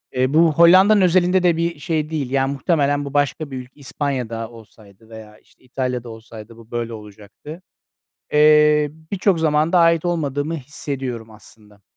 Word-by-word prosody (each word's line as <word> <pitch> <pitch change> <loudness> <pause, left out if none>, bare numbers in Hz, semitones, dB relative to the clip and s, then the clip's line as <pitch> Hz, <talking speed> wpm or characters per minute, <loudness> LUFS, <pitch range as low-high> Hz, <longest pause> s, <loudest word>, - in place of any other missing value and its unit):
E, 130 +2 0
bu 160 0 +4
Hollanda'nın 185 +6 +5
özelinde 180 0 +2
de 170 -2 +2
bir 170 -2 -2
şey 155 0 -3
değil, 145 -5 -4
yani, 135 0 0
muhtemelen 145 -1 0
bu 140 - -8
başka 145 0 -1
bir 130 - -5
ülk 125 0 -10
İspanya 135 -3 -4
da 115 -1 -6
olsaydı 110 -1 -18
veya, 110 -1 -13
işte, - - -30
İtalya 125 -1 -4
da 120 - -10
olsaydı 110 0 -12
bu 115 0 -17
böyle 120 -1 -4
olacaktı. 105 - -12 0.7
Eee, 150 0 +4 0.2
birçok 195 -3 +1
zamanda 160 +2 +1
ait 165 0 +3
olmadığımı 155 -2 -2
hissediyorum 130 -5 -7
aslında. 105 -1 -19
140 Hz, 160 wpm, -20 LUFS, 115-160 Hz, 0.7 s, Hollanda'nın